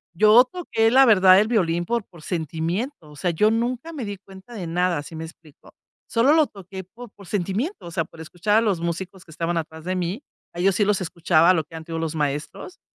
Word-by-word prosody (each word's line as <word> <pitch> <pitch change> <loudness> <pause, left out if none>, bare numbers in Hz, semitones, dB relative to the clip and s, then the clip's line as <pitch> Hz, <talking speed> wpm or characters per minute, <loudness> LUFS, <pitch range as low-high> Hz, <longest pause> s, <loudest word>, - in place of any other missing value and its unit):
yo 215 +6 +7
toqué 240 -8 0
la 265 +2 +7
verdad 190 -5 +7
el 215 - +2
violín 175 -7 +1
por 235 +1 -1
por 170 - -17
sentimiento. 165 - -3
O - - -14
sea, 175 +4 -1
yo 210 +6 +3
nunca 245 +7 -2
me 275 -7 -5
di 205 -1 -5
cuenta 190 +4 -15
de 190 -7 -6
nada, 175 -1 0
¿sí 160 - -11
me 160 0 -5
explico?, 160 -2 -16 0.4
solo 245 +6 +3
lo 315 -1 +5
toqué 190 -1 -10
por 235 +6 -13
por 200 - -16
sentimiento, 205 - -3
o - - -8
sea, 165 -1 -1
por 160 - -14
escuchar 175 +6 0
a - - +5
los 205 -6 0
músicos 175 +3 -5
que 165 - -16
estaban 170 +2 -2
atrás 160 -1 -5
de 185 +1 -1
mí. 180 +6 -3 0.3
A 170 - -8
ellos 190 +1 +2
sí 205 - +2
los 200 -1 +1
escuchaba 170 0 +3
lo 160 -3 0
que 165 - -13
han 160 - -7
tenido 165 0 -5
los 165 -1 -3
maestros, 150 - -4
185 Hz, 230 wpm, -23 LUFS, 165-220 Hz, 0.4 s, yo